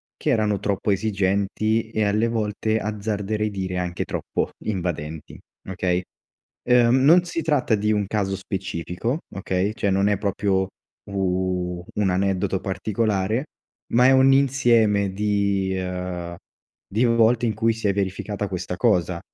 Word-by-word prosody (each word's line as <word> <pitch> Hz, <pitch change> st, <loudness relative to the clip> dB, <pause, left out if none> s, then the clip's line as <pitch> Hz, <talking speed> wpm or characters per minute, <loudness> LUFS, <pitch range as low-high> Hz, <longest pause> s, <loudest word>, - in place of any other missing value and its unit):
che -, -, -3 dB
erano 105 Hz, -6 st, +1 dB
troppo 100 Hz, +1 st, -1 dB
esigenti 100 Hz, +2 st, 0 dB
e, 110 Hz, -2 st, 0 dB
alle 105 Hz, +3 st, +1 dB
volte, 110 Hz, -1 st, -1 dB
azzarderei 105 Hz, 0 st, -2 dB
dire, 95 Hz, -2 st, -4 dB
anche 90 Hz, -1 st, -3 dB
troppo -, -, -3 dB
invadenti, 80 Hz, -6 st, -4 dB, 0.3 s
okay. 90 Hz, -1 st, 0 dB, 0.7 s
Ehm, 120 Hz, -1 st, +5 dB
non 170 Hz, +6 st, +6 dB
si 170 Hz, -1 st, -3 dB
tratta 145 Hz, -8 st, +1 dB
di 105 Hz, 0 st, 0 dB
un 105 Hz, -2 st, +1 dB
caso 95 Hz, -1 st, -1 dB
specifico, 95 Hz, -, -3 dB, 0.2 s
okay, 95 Hz, +1 st, -1 dB
cioè, 100 Hz, -, 0 dB
non 95 Hz, +1 st, +2 dB
è 105 Hz, -, +2 dB
proprio 95 Hz, -1 st, 0 dB, 0.4 s
u 90 Hz, -2 st, -1 dB
un 100 Hz, -2 st, +2 dB
aneddoto 95 Hz, 0 st, 0 dB
particolare, 105 Hz, +5 st, -1 dB, 0.5 s
ma 125 Hz, +2 st, +6 dB
è 135 Hz, -, +6 dB
un 135 Hz, 0 st, +6 dB
insieme 120 Hz, -7 st, +3 dB
di, 100 Hz, -1 st, 0 dB
ehm, 90 Hz, -1 st, -4 dB, 0.5 s
di 110 Hz, +5 st, +1 dB
volte, 115 Hz, 0 st, +3 dB
in 110 Hz, -, +1 dB
cui 115 Hz, +1 st, +2 dB
si 110 Hz, -1 st, -4 dB
è -, -, +3 dB
verificata 100 Hz, +1 st, -3 dB
questa 90 Hz, -1 st, -4 dB
cosa, 90 Hz, -6 st, +1 dB
100 Hz, 140 wpm, -23 LUFS, 95-110 Hz, 0.7 s, non